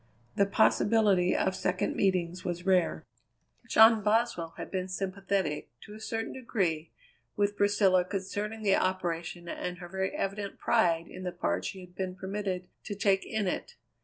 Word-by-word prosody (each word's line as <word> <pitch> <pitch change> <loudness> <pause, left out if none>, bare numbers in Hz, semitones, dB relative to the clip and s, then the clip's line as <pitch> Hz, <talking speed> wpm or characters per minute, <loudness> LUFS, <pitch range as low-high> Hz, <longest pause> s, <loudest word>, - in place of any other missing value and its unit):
The 200 - +3
possibility 190 - +3
of 190 - +1
second 185 0 -1
meetings 180 -2 0
was 175 0 -4
rare. 185 -3 +2 0.6
John 220 0 +7
Boswell 210 -6 +1
had - - -7
been 185 -1 -2
sympathetic, 190 -3 -2
to 210 - -11
a 215 - -10
certain 225 +1 -3
degree, 180 -11 -1 0.4
with 205 0 +1
Priscilla 205 -3 +4
concerning 205 +3 -4
the 195 -2 +4
operation 175 -2 -2
and 180 +1 -4
her 175 -1 -8
very 190 +1 -1
evident 200 0 -3
pride 165 -1 +2
in - - -9
the 180 -1 -3
part 90 - -1
she 190 - -5
had 180 -1 -13
been 185 0 -4
permitted 190 -1 -3 0.2
to 205 - -4
take 195 -1 +2
in 220 -2 -1
it. 180 - -3
190 Hz, 160 wpm, -30 LUFS, 180-205 Hz, 0.6 s, John